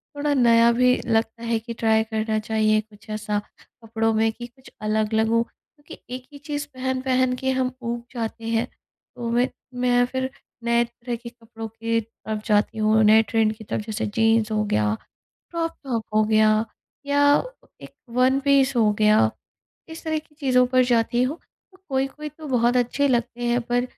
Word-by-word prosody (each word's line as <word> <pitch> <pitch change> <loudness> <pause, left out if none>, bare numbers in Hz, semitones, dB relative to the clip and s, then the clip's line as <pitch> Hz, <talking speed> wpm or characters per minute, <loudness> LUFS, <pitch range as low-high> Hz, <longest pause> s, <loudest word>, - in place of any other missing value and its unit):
थोड़ा 290 0 0
नया 235 -2 +5
भी 250 +1 +4
लगता 225 0 0
है 230 -1 +1
कि 230 +1 -7
ट्राई 220 -1 +2
करना 220 -1 -2
चाहिए 215 -1 +2
कुछ 215 0 -20
ऐसा 210 -1 -2 0.4
कपड़ों 225 0 0
में 220 0 +2
कि 240 +2 -9
कुछ 255 +2 -19 0.2
अलग 215 0 0
लगूँ, 225 +1 +3
क्योंकि 290 +4 -17 0.2
एक 255 0 -10
ही - - -9
चीज़ 290 0 -5
पहन-पहन 255 0 0
के 265 0 +1
हम 255 0 0
ऊब 235 0 -3
जाते 230 -1 -5
हैं 235 +2 +1 0.5
तो 235 -1 -4
मैं 245 +2 +2 0.3
मैं 245 0 +4
फिर 260 0 -2 0.3
नए 235 0 +3
तरह 235 +1 -6
के 235 0 -9
कपड़ों 225 -1 -9
की 230 +1 -1
तरफ 215 -1 -7
जाती 210 +1 +2
हूँ 215 0 +3
नए 220 +1 +7
ट्रेंड 220 -1 +3
की 220 - -12
तरफ 210 +1 -4
जैसे 220 0 -3
जीन्स 225 -1 +3
हो 215 0 +1
गया 105 - +1 0.6
क्रॉप 330 -1 -1
टॉप 235 -5 -2
हो 215 0 +4
गया 215 0 +3 0.4
या 285 0 +2 0.6
एक - - -11 0.2
वन 260 +2 +4
पीस 275 -2 +3
हो 215 -3 +4
गया, 215 0 +4 0.6
इस 320 0 -9
तरह 315 -1 0
की 300 0 -15
चीज़ों 260 -4 +3
पर 255 0 +3
जाती 240 0 +2
हूँ। 280 +6 -1 0.4
तो 375 - -20
कोई-कोई 270 +3 -2
तो 305 +1 -11
बहुत 245 -1 +2
अच्छे 250 +4 +1
लगते 240 -1 -1
हैं 240 +1 +2
पर 245 +1 0
235 Hz, 180 wpm, -23 LUFS, 220-255 Hz, 0.6 s, नए